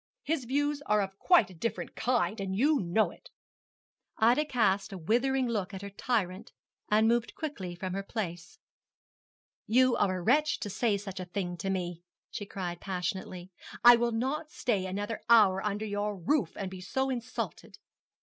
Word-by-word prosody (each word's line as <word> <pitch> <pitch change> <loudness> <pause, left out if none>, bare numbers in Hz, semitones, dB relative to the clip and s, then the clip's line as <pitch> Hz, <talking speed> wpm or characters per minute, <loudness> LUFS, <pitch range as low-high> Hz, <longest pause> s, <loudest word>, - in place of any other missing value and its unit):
His 290 -4 -1
views 290 +3 0
are 210 0 +3
of 195 -1 -3
quite 355 - +4
a - - -11
different 180 +7 -4
kind, 235 -3 0
and 190 -1 -3
you 285 +7 +3
know 190 +4 +1
it.' - - -16 0.9
Ida 245 +7 +4
cast 205 -7 +1
a 195 - -6
withering 245 +9 +1
look 205 -4 -2
at 190 - -7
her 200 - -6
tyrant, 200 -1 -2 0.4
and 215 +1 +4
moved 235 0 +1
quickly 205 - -5
from 185 +1 -4
her 195 - -2
place. 180 -5 -5 1.1
'You 250 +2 +4
are 185 -2 +1
a - - -5
wretch 290 - +3
to 205 - -3
say 215 0 +1
such 195 -2 -7
a 185 - -4
thing 180 -1 -3
to 195 +2 -3
me,' 175 -3 -3 0.3
she 205 - -5
cried 175 -3 -5
passionately; 185 -1 -4 0.3
'I 240 0 +10
will 235 0 +1
not 270 +7 -2
stay 205 -10 -1
another 205 +4 -4
hour 200 -5 +6
under 210 +1 -2
your 205 0 -2
roof 255 - 0
to 195 - -4
be 185 0 -8
so 265 +8 -1
insulted.' 250 -1 -5
210 Hz, 175 wpm, -30 LUFS, 190-245 Hz, 1.1 s, I